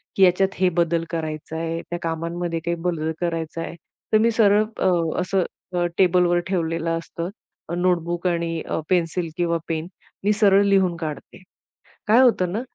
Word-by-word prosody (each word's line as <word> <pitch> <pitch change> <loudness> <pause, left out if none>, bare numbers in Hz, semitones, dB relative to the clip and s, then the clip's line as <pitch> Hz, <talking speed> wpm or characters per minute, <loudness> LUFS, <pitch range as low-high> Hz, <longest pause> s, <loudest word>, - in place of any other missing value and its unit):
की 195 - +4
ह्याच्यात 185 +1 +4
हे 185 - +4
बदल 170 -1 +2
करायचाय, 165 0 -4
त्या 175 0 -3
कामांमध्ये 165 +1 -2
काही 170 - 0
बदल 160 -2 0
करायचाय, 165 -1 -3 0.4
तर 215 - +8
मी 230 +2 +3
सरळ 210 -2 +4
अ, - - +2 0.3
असं 185 0 +1 0.3
अ, 175 0 +2
टेबलवर 180 -1 +4
ठेवलेलं 165 -3 -1
असतं, 170 +2 -6 0.4
अ, 170 - -2
नोटबुक 175 0 0
आणि 170 -2 -1
अ, - - -1
पेन्सिल 175 -1 +1
किंवा 170 -1 +1
पेन. 160 0 -2 0.4
मी 210 - +3
सरळ 200 -1 +5
लिहून 190 -3 +3
काढते. 160 +3 -7 0.7
काय 230 +4 +6
होतं 185 -8 +3
ना, 220 - -1
175 Hz, 155 wpm, -23 LUFS, 165-185 Hz, 0.7 s, तर